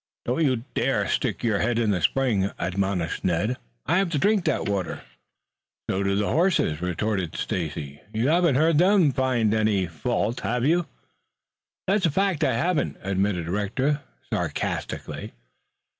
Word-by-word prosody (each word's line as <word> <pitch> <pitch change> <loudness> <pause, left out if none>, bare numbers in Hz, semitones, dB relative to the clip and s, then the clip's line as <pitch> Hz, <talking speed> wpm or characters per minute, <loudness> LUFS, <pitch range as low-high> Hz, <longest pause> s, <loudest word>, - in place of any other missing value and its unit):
"Don't 125 +7 +1
you 130 -5 +1
dare - - +1
stick - - -1
your 110 -4 +2
head 115 +1 +1
in 115 -3 +2
the 90 -3 0
spring," 115 -8 +2
admonished 95 -2 -1
Ned. 95 +8 0 0.3
"I - - +2
have 195 -2 +1
to 160 - -1
drink 200 +4 +2
that - - 0
water." 95 -5 -2 0.8
"So 95 - 0
do 100 0 +1
the 105 +1 0
horses," 165 - +2
retorted 90 0 -1
Stacy. 75 -4 -4
"You 115 +5 +1
haven't 170 -3 +3
heard 155 +2 +4
them 185 -4 +5
find 125 -5 +1
any 105 -3 +2
fault, 95 - -2
have 125 +1 -1
you?" 170 +3 +2 1.0
"That's 195 -1 +2
a - - +1
fact, 190 +1 +1
I 130 - +3
haven't," 155 +8 0
admitted 95 -2 0
Rector 110 - 0 0.3
sarcastically. - - -3
115 Hz, 150 wpm, -25 LUFS, 95-150 Hz, 1.0 s, them